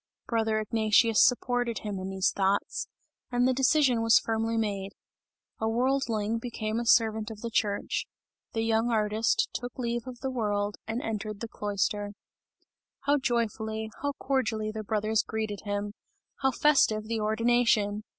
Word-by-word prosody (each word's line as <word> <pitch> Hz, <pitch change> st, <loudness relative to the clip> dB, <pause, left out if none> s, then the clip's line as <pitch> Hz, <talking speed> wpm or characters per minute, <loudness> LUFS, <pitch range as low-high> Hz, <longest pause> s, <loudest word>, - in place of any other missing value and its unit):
Brother 220 Hz, -2 st, +1 dB
Ignatius 220 Hz, +1 st, +3 dB
supported 245 Hz, -2 st, +1 dB
him 205 Hz, -3 st, -4 dB
in 185 Hz, 0 st, -5 dB
these 190 Hz, -1 st, +1 dB
thoughts, 195 Hz, +1 st, 0 dB, 0.4 s
and 245 Hz, 0 st, +3 dB
the 260 Hz, -, +3 dB
decision 265 Hz, -2 st, +3 dB
was 225 Hz, 0 st, +6 dB
firmly 225 Hz, 0 st, 0 dB
made 200 Hz, -3 st, -2 dB, 0.7 s
a 220 Hz, -, 0 dB
worldling 230 Hz, -3 st, 0 dB
became 225 Hz, -2 st, -3 dB
a 235 Hz, -, -3 dB
servant 220 Hz, -2 st, +3 dB
of 215 Hz, -2 st, -9 dB
the 235 Hz, -, -4 dB
church; 205 Hz, -2 st, -1 dB, 0.5 s
the 225 Hz, -, 0 dB
young 225 Hz, +1 st, +2 dB
artist 215 Hz, 0 st, +1 dB
took 245 Hz, +2 st, -5 dB
leave 240 Hz, -1 st, -2 dB
of 250 Hz, -1 st, -8 dB
the 265 Hz, -1 st, -2 dB
world, 205 Hz, -4 st, -1 dB
and 225 Hz, +3 st, -3 dB
entered 215 Hz, -1 st, -4 dB
the 230 Hz, -, -4 dB
cloister. 205 Hz, -1 st, -2 dB, 0.9 s
How 285 Hz, +1 st, +2 dB
joyfully, 220 Hz, -3 st, -2 dB
how 285 Hz, 0 st, -1 dB
cordially 240 Hz, -6 st, -1 dB
the 215 Hz, 0 st, -5 dB
brothers 215 Hz, +1 st, +1 dB
greeted 215 Hz, -2 st, -4 dB
him! 205 Hz, 0 st, -2 dB, 0.5 s
How 265 Hz, -, +4 dB
festive 260 Hz, -5 st, +3 dB
the 225 Hz, +1 st, -3 dB
ordination! 220 Hz, -1 st, +2 dB
220 Hz, 150 wpm, -28 LUFS, 210-240 Hz, 0.9 s, was